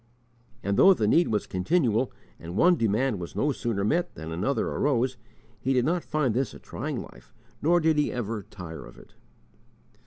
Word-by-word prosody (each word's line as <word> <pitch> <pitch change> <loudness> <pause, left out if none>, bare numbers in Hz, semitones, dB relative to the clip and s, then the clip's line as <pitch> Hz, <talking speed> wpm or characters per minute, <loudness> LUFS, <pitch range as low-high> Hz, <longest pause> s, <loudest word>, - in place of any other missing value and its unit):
And 100 0 0
though 190 0 +7
the 110 - 0
need 170 +10 +4
was 105 -1 0
continual, 120 - +1 0.3
and 85 +3 -7
one 175 +6 +5
demand 115 - +1
was 85 - -7
no 145 - +1
sooner 115 -6 -2
met 170 - 0
than 80 0 -7
another 100 +12 0
arose, 130 -2 +1 0.4
he 135 +5 0
did 125 -1 +2
not 175 +2 0
find 150 -7 0
this 130 0 -1
a - - -11
trying - - -5
life 65 0 -16 0.3
nor 175 +3 +4
did 160 -2 +2
he 150 - +1
ever 115 -3 -3
tire 90 -4 -9
of - - -15
it. - - -17
120 Hz, 185 wpm, -27 LUFS, 100-150 Hz, 0.4 s, though